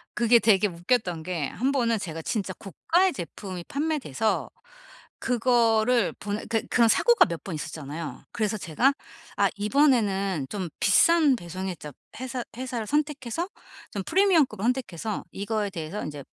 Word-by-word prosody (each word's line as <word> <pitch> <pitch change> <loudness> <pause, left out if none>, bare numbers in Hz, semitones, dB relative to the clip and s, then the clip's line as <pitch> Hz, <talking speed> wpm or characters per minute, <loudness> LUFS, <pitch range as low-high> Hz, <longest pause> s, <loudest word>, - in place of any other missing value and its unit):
그게 235 0 +5
되게 210 -2 +4
웃겼던 180 -1 -1
게 165 -5 -2
1 260 +4 -1
번은 235 -5 +1
제가 165 -4 -5
진짜 195 +1 -2
고가의 345 - +1
제품이 180 -2 -7
판매돼서 280 - -1 0.7
그거를 235 -1 +2
보내 205 +1 -4
그 225 -1 0
그런 235 -1 +4
사고가 475 - +5
몇 170 -3 -6
번 190 - -6
있었잖아요. 155 +1 -6
그래서 215 -1 -1
제가 210 - +2 0.4
'아 200 -1 +4
이번에는 205 - +2
좀 190 -4 -4
비싼 325 -5 +5
배송 185 -2 -6
회자 150 -4 -7 0.3
회사 255 -1 -4
회사를 250 -4 -4
선택해서 295 +1 -1 0.4
좀 200 - -4
프리미엄급을 345 - +3
선택해서 225 -5 -2
이거에 205 +1 -2
대해서 170 +2 -5
인제 145 -2 -6
220 Hz, 320 characters per minute, -26 LUFS, 185-255 Hz, 0.7 s, 그게